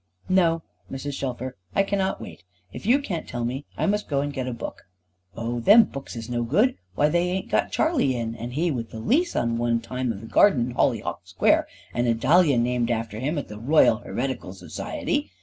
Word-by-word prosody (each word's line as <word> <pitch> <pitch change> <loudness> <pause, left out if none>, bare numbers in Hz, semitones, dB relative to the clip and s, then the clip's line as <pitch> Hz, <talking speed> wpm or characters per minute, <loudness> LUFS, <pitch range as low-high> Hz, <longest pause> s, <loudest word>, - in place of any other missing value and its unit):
"No, 165 -3 +3 0.3
Mrs. 140 +2 -4
Shelfer, 130 -3 -4 0.2
I - - +4
cannot 195 -1 -1
wait. 85 0 -10 0.3
If - - -7
you 250 +4 +6
can't 200 - -4
tell 120 -1 -3
me, 130 +4 -3
I - - 0
must 210 +1 0
go 140 -2 0
and 145 0 -3
get 130 -2 -3
a - - -2
book." 115 -6 -7 0.5
"Oh 115 +1 -3
them 210 - +8
books 140 - -8
is 115 -1 -6
no 120 -1 -1
good. 205 - +2 0.2
Why 145 - +3
they 175 +3 +1
ain't 185 +1 -3
got - - +1
Charley 280 - +2
in, 115 -1 -3
and 120 +2 -6
he 165 +3 +1
with 115 -5 -4
the - - -9
lease 315 - +1
one 115 0 +1
time 125 +1 -3
of 100 -3 -7
the - - -9
garden 125 - +4
in 125 - -5
Hollyhock 110 -8 0
Square, 90 - +2 0.3
and 120 0 0
a 115 - +3
dahlia 145 +3 +4
named 120 0 +1
after 115 -2 -2
him 145 +6 -1
at 145 - -3
the 105 0 -9
Royal 130 -2 +4
Heretical 120 -4 -4
Society! 95 +2 -3
125 Hz, 210 wpm, -25 LUFS, 115-165 Hz, 0.5 s, them